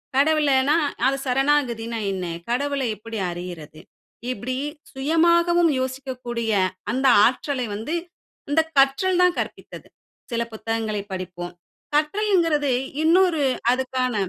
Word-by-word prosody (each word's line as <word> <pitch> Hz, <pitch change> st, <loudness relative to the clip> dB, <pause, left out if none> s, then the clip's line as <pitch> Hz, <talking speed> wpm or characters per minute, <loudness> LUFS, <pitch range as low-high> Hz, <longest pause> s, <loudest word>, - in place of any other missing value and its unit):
கடவுளனா 285 Hz, -1 st, +3 dB, 0.3 s
அது 270 Hz, +1 st, +2 dB
சரணாகதினா 250 Hz, -4 st, +1 dB
என்ன? 185 Hz, -1 st, -3 dB, 0.2 s
கடவுளை 275 Hz, +1 st, 0 dB
எப்டி 225 Hz, +1 st, -7 dB
அறியிறது?" 170 Hz, -3 st, -8 dB, 0.5 s
இப்டி 255 Hz, +3 st, -4 dB, 0.3 s
சுயமாகவும் 340 Hz, +4 st, +3 dB
யோசிக்கக்கூடிய, 255 Hz, -3 st, -3 dB, 0.4 s
அந்த 260 Hz, +3 st, -1 dB, 0.2 s
ஆற்றலை 255 Hz, +1 st, 0 dB
வந்து, 225 Hz, +11 st, -3 dB, 0.5 s
இந்த 320 Hz, +3 st, +4 dB, 0.2 s
கற்றல் 275 Hz, +7 st, +3 dB
தான் 360 Hz, -1 st, +4 dB
கற்பித்தது. -, -, -6 dB, 0.4 s
சில 235 Hz, 0 st, 0 dB
புத்தகங்களை 220 Hz, -1 st, -2 dB
படிப்போம். 180 Hz, -1 st, -6 dB, 0.4 s
கற்றல்ங்குறது 325 Hz, -3 st, +2 dB, 0.3 s
இன்னொரு 335 Hz, -2 st, +4 dB, 0.3 s
அதுக்கான 255 Hz, -1 st, -1 dB
265 Hz, 95 wpm, -23 LUFS, 230-305 Hz, 0.5 s, இந்த